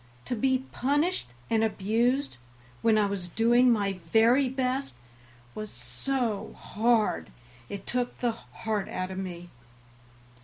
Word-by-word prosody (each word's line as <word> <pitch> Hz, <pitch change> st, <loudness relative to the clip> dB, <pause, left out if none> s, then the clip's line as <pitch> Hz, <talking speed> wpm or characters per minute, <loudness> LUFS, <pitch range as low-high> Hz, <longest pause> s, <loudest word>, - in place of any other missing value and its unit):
To 245 Hz, -, -2 dB
be 260 Hz, +2 st, +1 dB
punished 290 Hz, -, +1 dB, 0.2 s
and 225 Hz, -1 st, +2 dB
abused 225 Hz, -, +1 dB, 0.4 s
when 225 Hz, -1 st, +4 dB
I 210 Hz, -, +4 dB
was 195 Hz, -3 st, -3 dB
doing 240 Hz, +5 st, +4 dB
my 200 Hz, -4 st, +1 dB
very 225 Hz, +10 st, +3 dB
best 260 Hz, -, -1 dB, 0.6 s
was 215 Hz, 0 st, -5 dB
so 200 Hz, -, -2 dB
hard 225 Hz, 0 st, +1 dB, 0.4 s
it 200 Hz, -, -6 dB
took 245 Hz, 0 st, -1 dB
the 240 Hz, -1 st, +1 dB
heart 220 Hz, -2 st, -4 dB
out 185 Hz, 0 st, -3 dB
of 190 Hz, -, -4 dB
me. 175 Hz, -2 st, -6 dB
225 Hz, 125 wpm, -28 LUFS, 200-250 Hz, 0.6 s, when